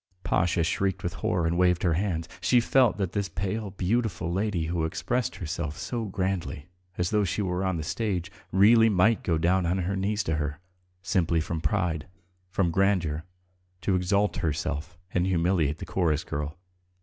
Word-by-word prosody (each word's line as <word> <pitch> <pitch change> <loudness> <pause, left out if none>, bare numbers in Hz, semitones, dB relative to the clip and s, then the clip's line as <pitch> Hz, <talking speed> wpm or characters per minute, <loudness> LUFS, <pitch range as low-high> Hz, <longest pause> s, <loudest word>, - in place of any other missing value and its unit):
Pasha 85 +1 +2
shrieked 95 +4 0
with 85 - -2
horror 90 -2 +1
and 85 +1 +1
waved 90 -1 +3
her 85 -3 +3
hands. 85 -2 -1
She 125 - +4
felt 125 -1 +3
that 95 -4 -1
this 100 -1 -2
pale, 100 +3 -3
beautiful 95 -3 -1
lady 95 -4 0
who 85 0 -1
expressed 120 +9 -1
herself 80 -3 -4
so 120 -2 -3
grandly, 95 -6 -2 0.3
as 90 -1 0
though 105 -1 +3
she 100 +3 -1
were 90 0 -1
on 95 -2 0
the 80 - -3
stage, 95 -1 -2 0.2
really 110 +4 +6
might 105 +3 +3
go 85 -3 +1
down 90 +2 +2
on 90 +3 +1
her 95 +2 -1
knees 100 +2 0
to 80 -1 -1
her, 75 -1 -3 0.4
simply 90 -3 +1
from 80 0 -3
pride, 80 0 0 0.4
from 90 -2 +1
grandeur, 85 -5 +1 0.6
to 95 - +1
exalt 100 +3 +1
herself 80 +2 -2 0.2
and 90 +1 +2
humiliate 85 -4 +1
the - - -7
chorus 80 -6 0
girl. 75 +2 -4
90 Hz, 175 wpm, -27 LUFS, 80-100 Hz, 0.6 s, really